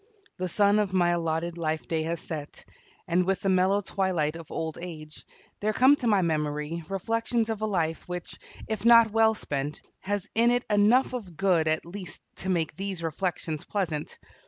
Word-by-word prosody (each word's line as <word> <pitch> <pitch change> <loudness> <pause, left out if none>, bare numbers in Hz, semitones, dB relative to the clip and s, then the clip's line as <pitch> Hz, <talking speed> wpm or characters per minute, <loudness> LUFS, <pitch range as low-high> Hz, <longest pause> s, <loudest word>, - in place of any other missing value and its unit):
The 185 0 -2
sun 205 +2 +4
of 200 -3 0
my 175 -2 +3
allotted 170 0 -1
life 155 -1 -2
day 160 -1 0
has 165 +2 -2
set, 150 -2 -7 0.4
and 175 +1 +2
with 190 +1 0
the 195 - 0
mellow 190 +2 +3
twilight 180 -6 -1
of 165 -2 -10
old 160 -1 -4
age 155 -3 -9 0.3
there 215 +1 0
come 260 +6 +6
to 245 - -2
my 205 -4 +4
memory 150 0 -1
reflections 225 +3 -1
of 215 -1 -4
a 215 - 0
life 165 -5 -1
which, 180 -1 -6 0.3
if 220 -2 -3
not 230 -1 +7
well 220 0 +4
spent, 145 -5 -4 0.2
has 205 +1 -3
in 230 +2 +4
it 245 0 +1
enough 215 +6 +4
of 195 -10 -6
good 175 -4 +2
at 155 +1 0
least 180 +1 -8 0.2
to 190 - -4
make 165 -4 0
these 190 -1 -4
reflections 165 -1 -3
pleasant. 165 -7 -3
180 Hz, 180 wpm, -27 LUFS, 160-205 Hz, 0.4 s, not